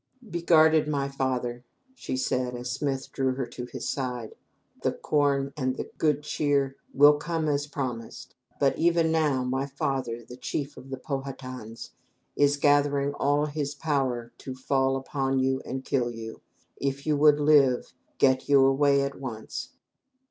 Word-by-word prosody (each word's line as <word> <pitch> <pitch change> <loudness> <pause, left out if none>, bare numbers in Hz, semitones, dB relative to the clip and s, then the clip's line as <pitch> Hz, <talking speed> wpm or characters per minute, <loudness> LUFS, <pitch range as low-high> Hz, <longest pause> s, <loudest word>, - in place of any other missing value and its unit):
"Be 170 -4 -4
guarded, 160 -2 +5
my 140 -2 0
father," 125 -3 -2 0.3
she 130 - -4
said, 125 -1 -1
as 125 +1 -4
Smith 135 0 -2
drew 130 -1 0
her 130 -1 -2
to 120 +1 -7
his - - -6
side. 125 -4 -3 0.5
"The - - 0
corn 140 -2 +1
and 130 -3 -1
the - - -6
good 150 -2 +2
cheer 140 -2 0 0.2
will 145 +2 +6
come 160 0 -2
as 145 0 0
promised, 125 -6 -5 0.3
but 140 -1 +3
even 165 -1 +3
now, 150 -5 +2
my 130 +2 -1
father, 135 -5 -3
the 125 - -11
chief 140 +3 -4
of 135 - -12
the 135 - -4
Pow 140 +1 -3
ha 135 0 -6
tans 130 -4 -9 0.4
is 145 0 +3
gathering 145 0 +2
all 145 +1 +1
his 145 -1 -3
power 130 -6 -1
to 130 - -7
fall 135 +1 +1
upon 135 0 -1
you 130 0 +1
and 130 0 -5
kill 125 -4 0
you. 115 -1 -8 0.4
If 140 0 -3
you 155 -1 +2
would 150 0 +5
live, 145 -4 +4 0.2
get 130 0 +3
you 140 -2 +6
away 140 +1 +4
at 140 0 -4
once." 115 -5 -6
135 Hz, 165 wpm, -27 LUFS, 130-145 Hz, 0.5 s, will